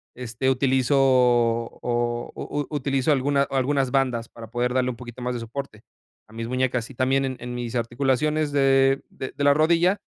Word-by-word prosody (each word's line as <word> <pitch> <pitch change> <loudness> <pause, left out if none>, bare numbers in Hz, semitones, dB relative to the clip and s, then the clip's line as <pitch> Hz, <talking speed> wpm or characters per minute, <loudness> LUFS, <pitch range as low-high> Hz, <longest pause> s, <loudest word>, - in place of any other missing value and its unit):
este 125 +1 -2
utilizo 130 +1 +2
o 120 -2 +1
o 145 - -5
u - - -6
utilizo 140 -1 0
alguna 140 0 +2
algunas 135 -1 0
bandas 125 -4 0
para 115 -1 -11
poder 120 +1 -1
darle 130 0 +1
un 125 - -4
poquito 120 0 -10
más 125 0 -2
de 120 - -4
soporte, 115 -2 -7 0.5
a 110 - -19
mis 115 0 -5
muñecas, 125 -1 -1
y 135 - -12
también 135 +2 +1
en 130 -1 -4
en 125 0 -6
mis 120 0 -5
articulaciones 135 +5 0
de 135 -1 +3
de 130 - -7
de 145 - -3
la 140 0 +6
rodilla, 170 +5 +3
130 Hz, 185 wpm, -24 LUFS, 120-140 Hz, 0.5 s, la